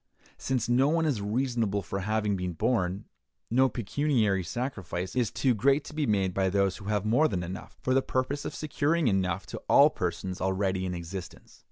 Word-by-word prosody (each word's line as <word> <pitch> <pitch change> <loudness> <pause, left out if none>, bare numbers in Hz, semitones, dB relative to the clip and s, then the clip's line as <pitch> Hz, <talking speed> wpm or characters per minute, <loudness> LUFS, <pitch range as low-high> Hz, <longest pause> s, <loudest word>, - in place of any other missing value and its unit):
Since 130 -4 -1
no 125 +3 +3
one 165 +1 +2
is 135 -9 0
responsible 110 -2 0
for 95 +3 -4
having 105 +1 0
been 90 -1 -3
born, 95 0 0 0.5
no 130 +2 +4
pecuniary 110 -3 0
sacrifice 95 -3 -4
is 120 -4 +1
too 125 +2 +1
great 135 +7 +2
to - - -10
be 150 -2 -1
made 95 -3 +1
by 95 0 +1
those 100 0 +1
who 100 - -11
have 105 0 -1
more 125 +9 +4
than 90 - -2
enough, 90 +2 -8
for 130 - +1
the 135 - +4
purpose 130 +3 -2
of - - -5
securing 155 +1 0
enough 95 -3 0
to - - -7
all - - +7
persons 95 -1 -3
already 95 0 0
in 90 - -3
existence. 85 +1 -8
105 Hz, 190 wpm, -28 LUFS, 95-130 Hz, 0.5 s, all